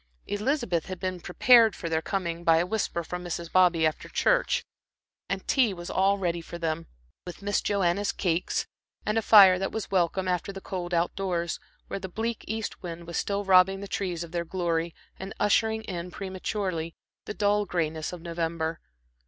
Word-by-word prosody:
Elizabeth 210 - -1
had 185 -2 -6
been 185 -1 -3
prepared 225 +6 +5
for 170 - -5
their 160 -1 0
coming, 170 -3 -3
by 165 -1 +5
a 170 - +2
whisper 180 -3 -2
from 180 +2 -6
Mrs. 170 -1 -5
Bobby 180 -3 +4
after 155 - -2
church; - - +2 0.7
and - - -3
tea 240 -8 +3
was 175 0 -7
all 195 +1 +3
ready 175 -3 -1
for 170 - -8
them 165 -1 -2 0.4
with 180 +2 -9
Miss 205 0 +1
Joanna's 200 0 +1
cakes, 175 -2 -1 0.4
and 210 - 0
a 225 - +3
fire 195 -4 +8
that 195 - -2
was 220 -2 -5
welcome 185 0 +1
after 180 +1 -1
the 195 - -7
cold 185 -2 -5
out 170 0 +1
doors, 175 -3 -2 0.3
where - - -5
the 190 0 -6
bleak 225 +4 -3
east 220 0 -4
wind 170 -1 -7
was 170 0 -4
still 200 0 -1
robbing 190 0 +5
the 200 - -6
trees 185 -4 -2
of 170 - -10
their 170 -1 -1
glory 170 -1 -2 0.2
and 190 +1 -7
ushering 220 +1 +2
in 180 -3 -5
prematurely 185 -3 -4 0.3
the 210 - -5
dull 205 0 +2
grayness 160 -3 -2
of 175 -2 -9
November. 165 -1 -2
180 Hz, 185 wpm, -27 LUFS, 170-200 Hz, 0.7 s, fire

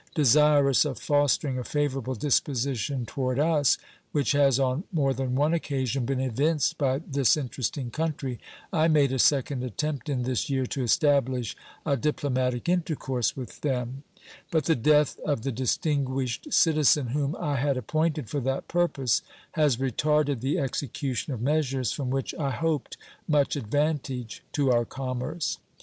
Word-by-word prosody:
Desirous 145 -1 +5
of 140 -6 -3
fostering 145 0 +1
a - - -4
favorable 135 -3 -1
disposition 135 0 0
toward 130 +1 -2
us, 150 -2 +3 0.3
which 145 -2 +1
has 140 -3 +4
on 135 +4 0
more 140 -6 +1
than 130 0 -2
one 150 +4 +2
occasion 135 -5 -1
been 135 +1 -1
evinced 135 +1 +1
by 135 -2 +2
this 140 -1 +3
interesting 130 -2 -3
country, 145 -5 -3 0.3
I 160 0 +3
made 145 -4 +3
a 130 - -1
second 135 -1 +2
attempt 140 +3 -3
in 130 -3 -1
this 125 +1 -1
year 135 -2 0
to 135 - -3
establish 130 -2 +2 0.3
a 140 -3 +1
diplomatic 130 -2 -1
intercourse 155 -9 0
with 130 -2 -8
them; 130 -2 -2 0.5
but 160 -3 +1
the 165 - +3
death 150 +4 +3
of 145 -7 -1
the 135 - -1
distinguished 130 - -1
citizen 150 -5 +4
whom 140 +3 -1
I 145 -2 -1
had 140 +1 +1
appointed 155 +2 -1
for 145 - -2
that 135 +1 -2
purpose 145 -9 +1 0.3
has 150 -6 +2
retarded 140 +1 +1
the 140 +7 0
execution 140 -1 -3
of 120 -3 -4
measures 135 -4 0
from 135 -3 -3
which 135 0 -2
I 140 -3 0
hoped 155 +1 -2 0.3
much 145 -2 +2
advantage 135 -2 -2
to 140 -3 +2
our 120 -1 +3
commerce. 130 +6 -4
135 Hz, 150 wpm, -27 LUFS, 130-150 Hz, 0.5 s, Desirous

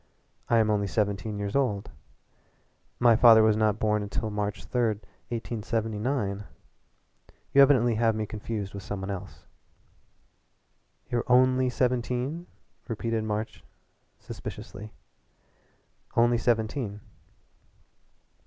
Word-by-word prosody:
"I 115 - +4
am 110 -1 +3
only 100 -1 +1
seventeen 105 +1 -1
years 100 0 -3
old. 105 -8 0 1.1
My 120 -2 +6
father 110 -1 +7
was 110 -1 +4
not 110 -1 +2
born 105 -1 +1
until 110 +2 -3
March 105 -3 -3
3, 125 +8 -1 0.5
1879. 110 -1 -2 1.1
You 140 - +7
evidently 130 -4 +5
have 115 0 +2
me 110 0 -2
confused 105 -1 -5
with 100 - -6
some 100 +1 -5
one 95 +1 -4
else." 95 -1 -8 1.7
"You're 120 -1 +1
only 130 +1 +4
seventeen?" 125 +6 -1 0.4
repeated 115 -1 -2
March 110 +1 -4 0.5
suspiciously. 105 +2 -8 1.2
"Only 120 0 +4
seventeen." 110 -2 -1
110 Hz, 105 wpm, -27 LUFS, 105-120 Hz, 1.7 s, father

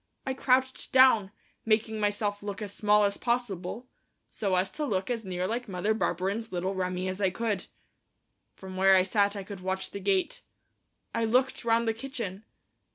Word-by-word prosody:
I 265 - -1
crouched 260 0 +1
down, 255 -7 +6 0.3
making 220 0 +1
myself 205 0 0
look 205 0 -5
as 200 -1 -6
small 210 0 +4
as 200 0 +1
possible, 235 -2 -2 0.4
so 195 -3 0
as 185 +1 +1
to 300 - -4
look 195 -5 -1
as 230 -2 -2
near 180 -1 -2
like 235 +3 -3
Mother 190 +3 0
Barberin's 205 +2 -1
little 185 +2 -2
Remi 185 -1 -2
as 185 +2 -4
I 190 - +4
could. 215 +2 -2 0.9
From 190 -1 -9
where 190 0 +6
I 185 - +5
sat 200 +1 +1
I 200 - -4
could 195 0 -8
watch 190 +1 -3
the 200 - -5
gate. 190 -1 0 0.7
I 230 - +1
looked 255 +4 +1
round 230 0 +2
the 225 - +2
kitchen. 225 -5 -6
205 Hz, 175 wpm, -28 LUFS, 190-230 Hz, 0.9 s, down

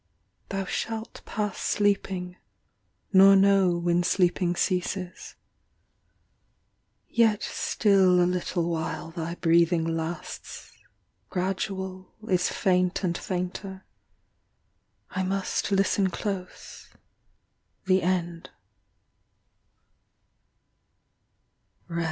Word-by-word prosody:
Thou 195 -1 -2
shalt 225 +3 -4
Pass 210 -3 -3
sleeping, 195 -3 0 0.8
nor 195 +1 +8
know 195 -2 +4
When 170 0 +1
sleeping 175 0 +1
ceases. 180 0 -2 1.7
Yet 225 -3 +2
still 190 -4 +3
A 175 - +4
little 180 -1 -1
while 165 0 -3
thy 170 0 -4
breathing 170 0 +3
lasts, 165 +1 -5 0.6
Gradual 190 0 -3
is 180 -3 +2
faint 180 0 +1
and 175 -2 0
fainter; 190 +2 -5 1.3
I 190 - -2
Must 195 +2 -1
listen 195 0 +2
close 185 -1 -6 1.0
the 190 0 +3
end." 175 -2 -2
185 Hz, 75 wpm, -26 LUFS, 175-195 Hz, 1.7 s, nor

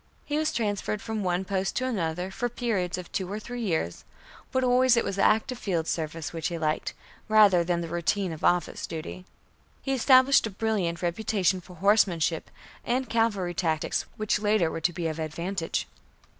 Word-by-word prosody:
He 295 +1 -1
was 310 0 +1
transferred 210 -2 -1
from 220 0 -4
one 180 +1 0
post 190 0 -1
to 255 - 0
another 180 -6 -2
for 245 +5 -2
periods 215 -8 -1
of 180 -1 -8
two 190 -1 -3
or 210 - -3
three 245 +3 -6
years, 160 - -2 0.5
but 260 - +1
always 250 0 +4
it 235 - +3
was 195 0 -3
active 230 +5 +2
field 170 -5 -1
service 160 -1 -3
which 165 -2 -2
he 170 - -3
liked, 155 -1 -1 0.3
rather 205 -5 +6
than 170 0 0
the 170 - -4
routine 175 +3 -1
of 155 - -10
office 175 -2 +1
duty. 165 +3 -7 0.6
He 270 - -1
established 260 0 +5
a - - -4
brilliant 195 -5 -1
reputation 190 0 +1
for 180 +1 -14
horsemanship 180 -4 +2 0.3
and 250 0 -1
cavalry 205 -6 +1
tactics 160 -3 -1
which 215 0 0
later 205 -6 +2
were 165 - -4
to 175 - +2
be 175 -1 -4
of 160 0 -2
advantage. 170 +3 -3
190 Hz, 180 wpm, -27 LUFS, 170-220 Hz, 0.6 s, rather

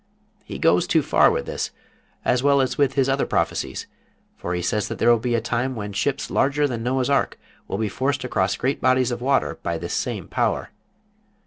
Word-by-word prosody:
He - - -7
goes - - +3
too - - +3
far - - +5
with - - -1
this, - - -3 0.6
as 125 - +2
well 140 0 +4
as 130 -1 +1
with 140 -2 +2
his 135 -2 +2
other 135 +1 +1
prophecies, - - -1 0.5
for 90 - -4
he 90 - -2
says 105 +4 0
that - - -5
there 120 - +4
will 120 - +4
be 120 +1 0
a 115 - +1
time 120 +3 -1
when 105 -2 -5
ships 140 +7 -1
larger 145 +2 +2
than 120 -4 -4
Noah's 125 +2 0
Ark 140 0 +1 0.3
will 95 - -3
be 110 0 0
forced 135 +6 -1
across 95 -7 0
great 135 +3 -1
bodies 130 -1 +3
of 120 0 -4
water 135 +1 +1
by 85 -1 -2
this 85 +1 -5
same - - -2
power. - - -1
125 Hz, 210 wpm, -23 LUFS, 110-135 Hz, 0.6 s, far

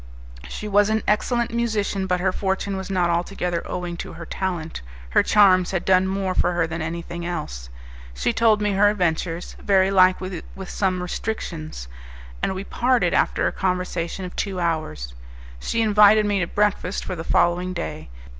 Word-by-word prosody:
She 210 - -6
was 205 0 +3
an 220 0 0
excellent 235 +2 +1
musician, 210 -4 -1
but 180 -1 +1
her 185 +1 +1
fortune 195 +1 -2
was 190 0 -5
not 180 -3 +1
altogether 175 0 -1
owing 175 -1 -4
to - - -7
her 170 - -8
talent; 170 - -4 0.3
her - - +5
charms 185 -4 +5
had 190 -2 -2
done 190 0 +4
more 190 -1 -1
for 180 - +1
her 175 -1 +1
than 165 +1 -5
anything 170 +1 -5
else. 150 - -5 0.5
She - - 0
told 220 -2 +3
me 210 - +1
her 205 +1 +4
adventures, 175 -3 -1
very 195 -1 +3
likely 185 -2 +3
with 190 -1 -7
some 185 -2 0
restrictions, 165 - -5 0.5
and 190 - -1
we 190 - -4
parted 250 +4 +1
after - - +2
a - - +2
conversation 180 -1 -2
of 180 - -8
two 195 -2 -2
hours. 115 - -2 0.5
She 230 - 0
invited 210 0 +6
me 205 -1 +1
to 180 - 0
breakfast 205 -2 0
for - - -4
the 165 - -5
following 175 +2 +2
day. 170 - -5
185 Hz, 175 wpm, -23 LUFS, 170-200 Hz, 0.5 s, invited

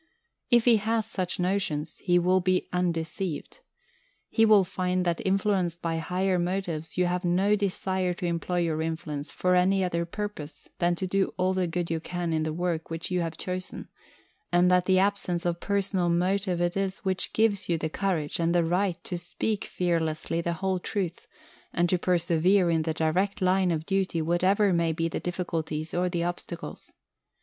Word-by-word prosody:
If 240 -1 +4
he 235 -2 +6
has 220 +1 0
such 185 -2 -3
notions, 180 -5 -1
he 175 -2 +2
will 180 +2 +3
be 185 0 +1
undeceived. 175 - -2 0.7
He 225 - +4
will 215 -3 +6
find 185 0 -1
that 170 -1 0
influenced 190 -3 +1
by 165 -1 -2
higher 180 +2 0
motives 175 -3 -2
you 180 - +3
have 180 +1 -1
no 185 +4 +3
desire 190 -2 -1
to 180 - -5
employ 175 +1 -1
your 160 -2 0
influence 160 -2 -4
for 180 0 0
any 190 +2 +3
other 170 -2 -1
purpose 205 -6 -6
than 175 0 +2
to 190 - -3
do 195 +1 0
all 185 +1 +2
the 185 -1 0
good 170 0 -2
you 165 - 0
can 175 0 -3
in 160 - +1
the 155 0 -1
work 170 0 -2
which 165 +2 -5
you 180 -1 +1
have 165 -1 -3
chosen, 185 0 -5 0.6
and 175 +1 +4
that 180 0 +4
the 185 0 +4
absence 190 -3 +1
of 170 -1 0
personal 195 -3 0
motive 180 +1 +1
it 175 0 0
is 195 -1 -2
which 190 -1 -1
gives 215 -4 +1
you 170 - +2
the 160 - -2
courage 165 -3 -1
and 170 +1 +1
the 175 - +4
right 180 +1 +1
to 175 - -4
speak 210 +4 -2
fearlessly 165 -2 -1
the 170 0 -1
whole 190 +2 -1
truth, 180 -2 -3 0.5
and 175 0 +2
to 180 - +2
persevere 175 +1 +3
in 165 -1 +2
the 160 0 -1
direct 180 +6 0
line 185 -1 +3
of 160 -2 -1
duty 190 -3 0
whatever 185 +5 +2
may 170 -1 +2
be 165 +1 -1
the 165 - -3
difficulties 165 -3 -3
or 180 +1 +1
the 170 -1 -1
obstacles. 175 0 -6
180 Hz, 185 wpm, -27 LUFS, 170-190 Hz, 0.7 s, he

